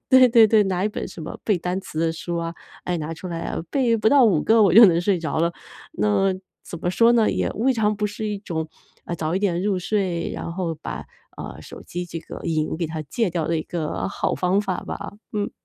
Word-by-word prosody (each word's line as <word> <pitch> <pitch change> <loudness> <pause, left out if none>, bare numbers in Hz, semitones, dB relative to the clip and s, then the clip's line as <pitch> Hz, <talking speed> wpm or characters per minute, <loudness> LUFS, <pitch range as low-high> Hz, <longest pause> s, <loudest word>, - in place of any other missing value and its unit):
对 260 -1 +8
对 230 -2 +7
对， 215 -1 +5
拿 190 0 -1
一 - - +2
本 210 - -5
什 165 - -9
么 160 - -6
背 210 -4 +2
单 180 +3 -2
词 155 - -8
的 165 0 +1
书 170 +1 -4
啊， 165 0 -3 0.3
哎， 180 -1 -1
拿 155 +1 -4
出 175 - -9
来 170 -2 -4
啊， - - -3
背 245 -5 +2
不 215 0 -2
到 280 -2 +6
5 180 -9 +3
个 225 0 +5
我 190 -5 +4
就 230 +1 +11
能 170 -3 +5
睡 185 0 +1
着 155 -2 -2
了。 170 +1 +2 0.4
那 105 - +2 0.3
怎 170 - -8
么 175 - 0
说 230 +5 +4
呢， 230 -2 +4
也 - - 0
未 260 +5 +1
尝 210 -3 +1
不 210 0 0
是 210 +1 -4
一 210 - -2
种， 160 -5 -4 0.4
呃， 175 - -4
早 160 +1 -2
一 - - +2
点 185 -3 0
入 200 -2 +1
睡， 180 -3 -1
然 170 - -5
后 170 -2 -2
把， 155 - -7 0.3
呃， - - -7
手 - - -11
机 175 +1 -5
这 165 -1 -6
个 - - -9
瘾 155 -2 -1
给 170 0 -2
它 160 0 -5
戒 195 - -1
掉 165 -2 -2
的 165 - +1
一 - - -3
个 160 -2 -3
好 - - -1
方 185 +2 +1
法 190 -3 -2
吧， - - -7 0.2
嗯。 205 -1 -1
180 Hz, 260 characters per minute, -23 LUFS, 165-210 Hz, 0.4 s, 就